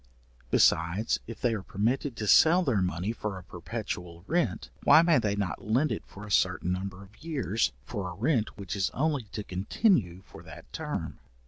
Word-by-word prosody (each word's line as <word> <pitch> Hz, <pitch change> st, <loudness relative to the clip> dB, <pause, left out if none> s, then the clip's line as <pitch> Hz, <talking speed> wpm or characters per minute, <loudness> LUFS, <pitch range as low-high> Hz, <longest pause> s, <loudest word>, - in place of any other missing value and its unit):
Besides, 85 Hz, -, +3 dB
if 115 Hz, -, -8 dB
they 120 Hz, -2 st, +1 dB
are 105 Hz, -, -3 dB
permitted 115 Hz, +8 st, -1 dB
to 110 Hz, -, -4 dB
sell 165 Hz, -, +6 dB
their 125 Hz, -, +1 dB
money 90 Hz, +3 st, -1 dB
for 105 Hz, -3 st, -4 dB
a 95 Hz, -, -9 dB
perpetual 90 Hz, -2 st, -6 dB
rent, 175 Hz, +6 st, -1 dB
why 160 Hz, -, +7 dB
may 170 Hz, -4 st, +4 dB
they 105 Hz, -3 st, 0 dB
not 100 Hz, -4 st, -3 dB
lend 125 Hz, +9 st, +1 dB
it -, -, -2 dB
for 105 Hz, +2 st, -10 dB
a 105 Hz, -, -9 dB
certain 90 Hz, -2 st, +2 dB
number 95 Hz, +1 st, -4 dB
of 105 Hz, +8 st, -18 dB
years, 135 Hz, -, 0 dB
for 95 Hz, +3 st, -4 dB
a 90 Hz, -, -8 dB
rent 115 Hz, -, 0 dB
which 100 Hz, -1 st, -5 dB
is 95 Hz, -2 st, +1 dB
only 145 Hz, -2 st, 0 dB
to 105 Hz, +1 st, -6 dB
continue 95 Hz, -, +1 dB
for -, -, -13 dB
that -, -, -13 dB
term? -, -, -4 dB
105 Hz, 190 wpm, -28 LUFS, 95-125 Hz, -, why